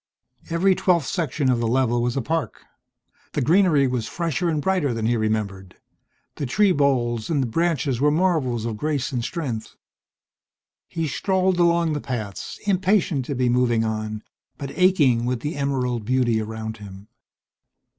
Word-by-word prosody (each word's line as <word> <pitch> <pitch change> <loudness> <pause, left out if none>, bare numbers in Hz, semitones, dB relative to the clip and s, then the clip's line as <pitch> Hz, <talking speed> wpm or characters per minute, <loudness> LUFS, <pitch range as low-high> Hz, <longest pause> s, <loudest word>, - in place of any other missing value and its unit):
Every 175 +3 +3
twelfth 175 -5 +2
section 150 -6 0
of 120 - +1
the 115 - 0
level 120 0 +1
was 120 +2 -1
a 135 - -1
park. 160 +4 -3 0.7
The - - 0
greenery 165 -2 +4
was 125 -3 -1
fresher 170 0 -1
and 155 -2 0
brighter 155 -7 0
than 110 -1 -2
he 120 +1 +2
remembered; 105 -4 -2 0.6
the 140 - -3
tree 200 +9 +3
boles 125 -7 +1
and 145 -5 +1
the - - -2
branches 145 -2 0
were 150 - +4
marvels 150 -9 +1
of 115 -2 -3
grace 145 0 -1
and 125 -3 -2
strength. 125 -9 -4 1.1
He 165 -1 -3
strolled 185 +3 0
along 170 -2 +3
the 145 - -3
paths, 110 -7 -5
impatient 190 -7 +1
to 140 - -3
be 125 0 +1
moving 120 -2 +2
on, 110 -1 -3 0.3
but 140 -2 -6
aching 150 -11 +3
with 125 -1 -1
the 150 +2 -3
emerald 130 -4 -1
beauty 120 -1 +1
around 110 0 -5
him.... 100 -1 -11
130 Hz, 160 wpm, -23 LUFS, 115-165 Hz, 1.1 s, greenery